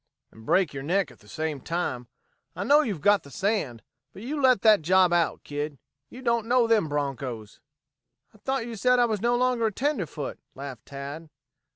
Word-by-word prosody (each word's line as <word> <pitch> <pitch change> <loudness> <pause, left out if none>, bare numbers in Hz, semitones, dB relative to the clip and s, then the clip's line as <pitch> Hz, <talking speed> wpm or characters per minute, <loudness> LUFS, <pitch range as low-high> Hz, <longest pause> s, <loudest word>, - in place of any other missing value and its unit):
"And 110 0 -16
break 185 -5 +3
your 135 - -5
neck 175 +5 0
at - - -18
the 105 - -20
same 155 +3 -3
time. 130 -8 -3 0.5
I - - -3
know 290 +2 +5
you've 205 - -3
got 205 +4 +4
the 140 - -14
sand, 190 - -2 0.3
but 195 - -10
you 285 +4 -3
let 255 -6 +4
that 215 -5 +6
job 180 +2 +4
out, 170 -1 +1
kid. 145 0 -4 0.3
You 255 - -11
don't 235 -2 +1
know 245 0 +4
them 220 -8 +2
bronchos." 130 -7 -4 0.7
"I 215 - -20
thought 265 +1 -2
you 235 -1 -6
said 250 +4 +3
I 245 - +5
was 215 -4 -2
no 240 +1 +2
longer 245 -2 +2
a - - -1
tenderfoot," 200 - -3 0.2
laughed 135 -4 -8
Tad. 140 +3 -7
185 Hz, 195 wpm, -26 LUFS, 145-235 Hz, 0.7 s, that